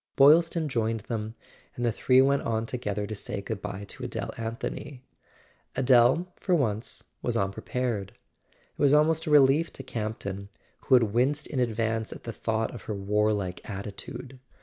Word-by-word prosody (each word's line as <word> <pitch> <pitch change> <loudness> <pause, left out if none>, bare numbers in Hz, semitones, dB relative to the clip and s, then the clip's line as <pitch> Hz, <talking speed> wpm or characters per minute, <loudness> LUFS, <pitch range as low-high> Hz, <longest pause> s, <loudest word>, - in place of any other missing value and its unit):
Boylston 160 +3 +5
joined 115 -4 -1
them, 110 0 -4 0.4
and 120 - -2
the 120 - +3
three 130 +3 +4
went 140 +1 +3
on 115 0 -1
to¬ 125 +1 -5
gether 105 -2 -2
to 110 - -5
say 105 0 -5
goodbye 100 -1 -5
to - - -8
Adele - - -4
Anthony. 115 +3 -5 0.7
Adele, 130 +5 +5
for 185 - +1
once, 110 -8 -1 0.2
was - - 0
unprepared: 100 +1 -2 0.4
it - - -15
was 145 0 +6
almost 160 +2 +3
a - - 0
relief 150 +2 +5
to 135 - -8
Camp 110 -4 -4
ton, 100 0 -5 0.4
who 130 - +6
had 125 - +6
winced 135 +5 +2
in 135 - -3
advance 115 -2 0
at - - -9
the 115 - -5
thought 110 0 -1
of 120 - -9
her 105 - -3
■warlike 100 -2 0
attitude. 105 +6 -7
115 Hz, 170 wpm, -28 LUFS, 105-135 Hz, 0.7 s, was